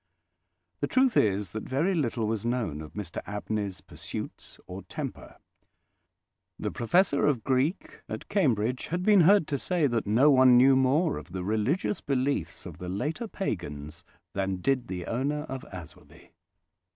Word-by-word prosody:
The 145 Hz, -, 0 dB
truth 260 Hz, -, +3 dB
is 100 Hz, -2 st, +2 dB
that 110 Hz, -, -4 dB
very 150 Hz, -, 0 dB
little 120 Hz, -8 st, 0 dB
was 110 Hz, -1 st, -1 dB
known 115 Hz, -11 st, -1 dB
of 75 Hz, -, -10 dB
Mr 100 Hz, -5 st, -5 dB
Abney's 105 Hz, -1 st, -3 dB
pursuits -, -, -8 dB
or -, -, -7 dB
temper. -, -, -7 dB, 1.2 s
The -, -, -3 dB
Professor 140 Hz, -, +2 dB
of 130 Hz, -7 st, +1 dB
Greek 135 Hz, +7 st, 0 dB
at -, -, -6 dB
Cambridge 125 Hz, -, +1 dB
had 175 Hz, +3 st, -2 dB
been 205 Hz, -1 st, +6 dB
heard 195 Hz, +1 st, +6 dB
to 140 Hz, -2 st, -1 dB
say 175 Hz, -4 st, +1 dB
that 120 Hz, -6 st, 0 dB
no 125 Hz, +8 st, +5 dB
one 130 Hz, -2 st, +7 dB
knew 130 Hz, +2 st, +6 dB
more 140 Hz, +5 st, +2 dB
of 85 Hz, -, -14 dB
the 95 Hz, -1 st, -3 dB
religious 110 Hz, -, 0 dB
beliefs 130 Hz, -, -1 dB
of -, -, -9 dB
the 90 Hz, -, -5 dB
later 150 Hz, -, -3 dB
pagans 85 Hz, -, -5 dB, 0.3 s
than 95 Hz, -1 st, -1 dB
did 125 Hz, +5 st, 0 dB
the 90 Hz, -2 st, -5 dB
owner 140 Hz, +5 st, -1 dB
of 135 Hz, -4 st, -7 dB
Aswarby. 90 Hz, -4 st, -12 dB
125 Hz, 155 wpm, -28 LUFS, 100-150 Hz, 1.2 s, one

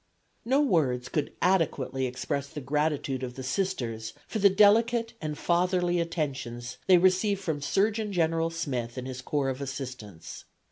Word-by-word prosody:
No 265 Hz, +5 st, +3 dB
words 140 Hz, -, +1 dB
could 150 Hz, -2 st, -1 dB
adequately 140 Hz, -8 st, +1 dB
express 140 Hz, +3 st, -3 dB
the 150 Hz, -, -7 dB
gratitude 145 Hz, -1 st, -1 dB
of 125 Hz, -1 st, -5 dB
the 130 Hz, -, -6 dB
Sisters 125 Hz, -, -2 dB
for 220 Hz, -, -3 dB
the 200 Hz, 0 st, +7 dB
delicate 225 Hz, +4 st, +4 dB
and 150 Hz, -1 st, -3 dB
fatherly 175 Hz, 0 st, +1 dB
attentions 135 Hz, -7 st, -3 dB
they 185 Hz, -, +7 dB
received 185 Hz, +3 st, +3 dB
from 160 Hz, -6 st, -2 dB
Surgeon 210 Hz, +6 st, +1 dB
General 165 Hz, -2 st, +1 dB
Smith 130 Hz, -8 st, -3 dB
and 130 Hz, -, -4 dB
his 130 Hz, 0 st, -6 dB
corps 140 Hz, 0 st, -1 dB
of 130 Hz, +1 st, -4 dB
assistants. 125 Hz, -, -7 dB
150 Hz, 150 wpm, -28 LUFS, 130-185 Hz, -, the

